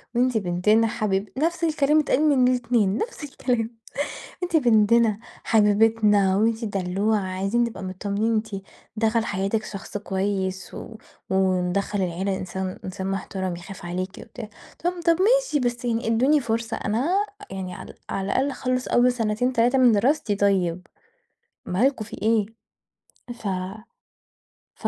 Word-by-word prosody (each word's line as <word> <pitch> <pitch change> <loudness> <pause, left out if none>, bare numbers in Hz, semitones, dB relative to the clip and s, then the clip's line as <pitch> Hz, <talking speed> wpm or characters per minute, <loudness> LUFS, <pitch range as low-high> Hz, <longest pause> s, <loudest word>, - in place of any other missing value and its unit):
وأنتِ 250 -1 +2
بنتنا 210 +4 +2
حبيب 205 -2 -1
نفْس 335 +3 0
الكلام 305 -2 +3
بيتقال 300 -2 +2
من 260 -3 +4
الإتنين، 235 -5 +1
نفْس 460 - -4
الكلام. 245 -5 -1 0.7
أنتِ 350 -1 -1
بنتنا، 225 -4 +4 0.2
حبيبتنا 210 -2 +4
وأنتِ 225 +2 +1
الدلّوعه، 200 +1 0
عايزين 195 +5 0
نبقى 235 -4 -4
متطمّنين 200 +4 -1
أنتِ 215 0 -1 0.5
دخَل 225 +1 +1
حياتِك 200 +2 -1
شخص 200 0 -6
كويس 190 -2 -2
و 225 - -8 0.3
وندخّل 190 +1 +1
العيلة 190 +2 -1
إنسان 185 0 -5
إنسان 190 0 -4
محترَم 190 -1 -3
يخاف 175 +1 -10
عليكِ 180 +2 -3
وبتاع، 225 -4 -9 0.3
طَب 350 - +2
طَب 335 -1 +4
ماشي، - - +3
بس 245 -1 -2
يعني 230 -1 -1
إدّوني 260 +7 +3
فرصة 230 -3 -2
أنا 330 - 0 0.3
يعني 185 -1 -5
ع - - -9 0.2
على 195 - -2
الأقل 260 +8 +1
أخلّص 255 -1 -2
أول 245 +1 +4
سنتين 235 +1 0
3 245 +3 +3
من 250 -2 +6
دراستي 225 +1 +2
طيب. 185 -3 +1 0.8
مالكم 225 +4 +1
في - - -9
إيه 220 -1 +3 0.9
ف 230 - -10 1.3
ف - - -3
220 Hz, 135 wpm, -24 LUFS, 195-245 Hz, 1.3 s, من